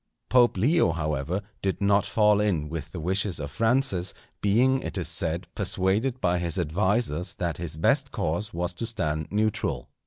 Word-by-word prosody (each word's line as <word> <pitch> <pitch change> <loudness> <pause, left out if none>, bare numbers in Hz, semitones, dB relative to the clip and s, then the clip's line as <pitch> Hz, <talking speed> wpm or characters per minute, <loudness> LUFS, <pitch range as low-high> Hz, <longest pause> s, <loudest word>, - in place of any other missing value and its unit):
Pope 120 -4 +4
Leo, 135 - +3
however, 75 +4 -2 0.2
did 95 -1 -1
not 100 0 +2
fall 105 -1 +3
in 85 -8 0
with 80 -1 -6
the 85 - -6
wishes 95 +2 0
of 70 -1 -5
Francis, 115 -5 +1 0.3
being, 125 +6 +3
it - - -5
is - - -2
said, - - -1
persuaded 110 +8 0
by 90 -5 +1
his 85 0 -2
advisers 90 +1 0
that 85 -3 -2
his 80 -3 -5
best 80 - +2
course 95 +8 -2
was 90 -1 -2
to 115 +6 -4
stand 80 -9 -2
neutral. 105 +1 -1
95 Hz, 165 wpm, -26 LUFS, 85-110 Hz, 0.3 s, Pope